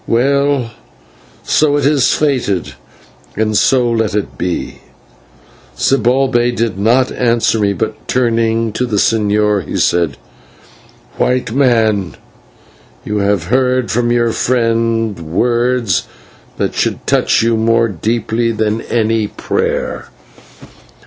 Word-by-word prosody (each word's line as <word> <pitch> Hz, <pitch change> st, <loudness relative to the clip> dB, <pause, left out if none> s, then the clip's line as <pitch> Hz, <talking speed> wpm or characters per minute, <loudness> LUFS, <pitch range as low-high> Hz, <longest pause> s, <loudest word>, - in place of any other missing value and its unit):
Well, 140 Hz, 0 st, +1 dB, 0.7 s
so 145 Hz, -1 st, +2 dB
it 145 Hz, -, -1 dB
is 145 Hz, -2 st, +3 dB
fated, 125 Hz, -, -1 dB, 0.6 s
and 110 Hz, 0 st, 0 dB
so 125 Hz, +2 st, +3 dB
let 110 Hz, -2 st, 0 dB
it 105 Hz, -, -3 dB
be!" 90 Hz, -1 st, -4 dB, 1.0 s
Zibalbay 125 Hz, -, +1 dB
did 115 Hz, -5 st, -2 dB
not 120 Hz, +5 st, +2 dB
answer 115 Hz, -2 st, +1 dB
me, 100 Hz, -1 st, +1 dB
but, 95 Hz, -, -5 dB
turning 115 Hz, -2 st, 0 dB
to 125 Hz, +3 st, -1 dB
the 110 Hz, -, -2 dB
señor, 105 Hz, -1 st, +1 dB
he -, -, -5 dB
said: 85 Hz, -5 st, +1 dB, 1.0 s
"White 125 Hz, -3 st, 0 dB
Man, 110 Hz, -8 st, +1 dB, 0.9 s
you 105 Hz, -, -2 dB
have 100 Hz, -3 st, +1 dB
heard 125 Hz, +4 st, 0 dB
from 120 Hz, +1 st, 0 dB
your 120 Hz, -1 st, +2 dB
friend 115 Hz, -4 st, 0 dB
words 120 Hz, +4 st, 0 dB, 0.5 s
that -, -, -1 dB
should -, -, -2 dB
touch -, -, +2 dB
you 115 Hz, 0 st, +2 dB
more 115 Hz, +1 st, +2 dB
deeply 115 Hz, +3 st, -1 dB
than 110 Hz, 0 st, -1 dB
any 110 Hz, -2 st, 0 dB
prayer. -, -, -3 dB
115 Hz, 115 wpm, -15 LUFS, 105-125 Hz, 1.0 s, is